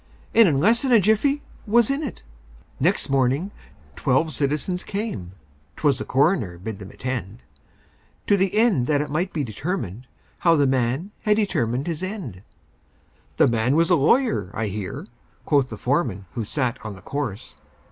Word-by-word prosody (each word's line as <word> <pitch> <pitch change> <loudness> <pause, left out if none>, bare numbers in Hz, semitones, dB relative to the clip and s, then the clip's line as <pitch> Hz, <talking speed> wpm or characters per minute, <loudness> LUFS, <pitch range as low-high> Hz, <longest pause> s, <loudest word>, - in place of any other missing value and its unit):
And 230 -2 +7
in 140 -3 +1
less 225 - +4
than 265 - 0
a 235 - +7
jiffy 220 +9 +2 0.2
was 235 +3 +4
in 275 +2 -1
it! 280 -7 -6 0.6
Next - - +1
morning 135 +7 +1 0.4
twelve 145 +4 +1
citizens 150 +7 -1
came 200 - -4 0.4
('Twas 140 -3 +1
the - - -4
coroner 135 - +1
bade 100 +3 -6
them 100 -1 -9
attend), 120 -3 -5 0.8
To 205 - +4
the 195 0 +1
end 215 - +3
that 145 -2 +2
it 150 - -5
might 175 +5 -1
be 150 - -2
determined 125 - -4 0.3
How 170 -1 +4
the 145 -2 +3
man 130 - 0
had 210 -1 +3
determined 130 - 0
his 165 -2 -3
end! 185 - -5 1.0
"The - - +5
man 120 +3 +1
was 165 +3 +3
a - - +7
lawyer, 160 - +2
I 110 -1 -1
hear," 100 -1 -5 0.4
Quoth 140 -3 +2
the 110 - -7
foreman 125 - -1
who 115 - -3
sat 125 +1 -2
on 110 -2 -6
the 95 - -15
corse. 140 -8 -5
145 Hz, 165 wpm, -23 LUFS, 115-195 Hz, 1.0 s, And